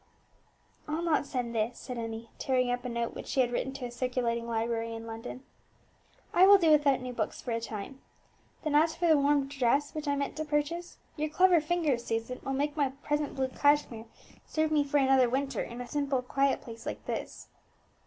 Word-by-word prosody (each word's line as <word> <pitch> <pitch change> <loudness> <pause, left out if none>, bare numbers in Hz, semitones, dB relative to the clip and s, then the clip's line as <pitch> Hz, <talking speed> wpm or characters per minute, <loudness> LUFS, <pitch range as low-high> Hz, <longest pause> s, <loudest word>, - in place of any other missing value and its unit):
"I'll 310 +3 -2
not 310 -4 +1
send 245 -3 -3
this," 225 +2 -1
said 250 -3 -6
Emmie, 225 0 -6
tearing 255 -2 +1
up 245 0 -2
a - - -2
note 235 0 -2
which - - -8
she 265 - +2
had 245 -1 +1
written 265 +2 -1
to 270 -2 -5
a 240 - -6
circulating 240 -1 -1
library 230 0 -1
in 225 0 -7
London; 230 +3 -7 0.9
"I 370 +2 +7
will 400 0 +9
do 335 -4 +3
without 285 -4 +4
new 250 0 -5
books 220 -3 -3
for 245 - -5
a 230 0 -1
time. 225 +4 -7 0.6
Then 305 -2 -1
as 320 +2 +4
for 345 - -1
the 320 - +6
warm 285 -1 +3
dress 275 +1 +1
which 305 -1 -5
I 285 - +2
meant 280 0 -2
to 310 - -1
purchase, 305 +3 -2 0.2
your 305 +1 -1
clever 360 +1 +5
fingers, 305 -7 0
Susan, 225 +3 -3
will 270 - -2
make 290 +2 -1
my 285 -3 +2
present 295 -1 -1
blue 265 -1 0
cashmere 285 -5 +1 0.4
serve 310 0 0
me 300 -2 +3
for 285 +1 0
another 265 -2 +4
winter 275 +2 -1
in 235 +1 -6
a 275 +1 -1
quiet 275 +2 +1
place 230 0 -10
like - - -5
this." - - -5
270 Hz, 205 wpm, -30 LUFS, 235-295 Hz, 0.9 s, will